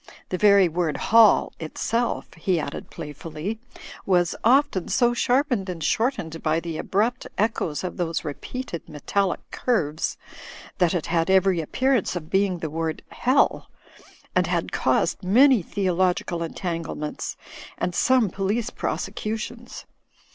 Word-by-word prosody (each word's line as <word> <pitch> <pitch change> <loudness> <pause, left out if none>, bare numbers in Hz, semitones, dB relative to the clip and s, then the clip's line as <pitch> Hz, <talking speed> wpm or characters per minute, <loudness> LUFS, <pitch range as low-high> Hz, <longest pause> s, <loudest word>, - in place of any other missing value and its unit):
The 185 - -1
very 200 -3 +6
word 165 -1 -1
"hall" 225 -1 +5
itself 230 +9 -2
(he 170 +1 0
added 140 - -5
play 150 - -7
fully) 165 +8 -5 0.4
was 175 -3 +2
often 255 -6 +3
so 240 -2 +3
sharpened 245 -5 +1
and 170 -3 -5
shortened 175 - -1
by 155 +1 +1
the 165 -2 -5
abrupt 230 +6 0
echoes 200 -8 0
of 180 - -4
those 170 -2 -2
repeated 170 - -6
metallic 185 +6 -1
curves, 160 - -1 0.6
that 180 -1 +3
it 170 - -1
had 165 +1 0
every 190 -2 +4
appearance 255 - 0
of 160 -3 -6
being 195 -1 +2
the 160 -2 -4
word 160 0 -3
''hell," 260 +3 +2 0.7
and - - +3
had - - -1
caused - - +1
many 245 +5 +5
theological 180 -2 0
entanglements, 165 -3 -4 0.4
and 175 0 -2
some 250 -2 +3
police 210 +6 -1
prosecutions. 230 +3 -4
185 Hz, 130 wpm, -24 LUFS, 165-230 Hz, 0.7 s, very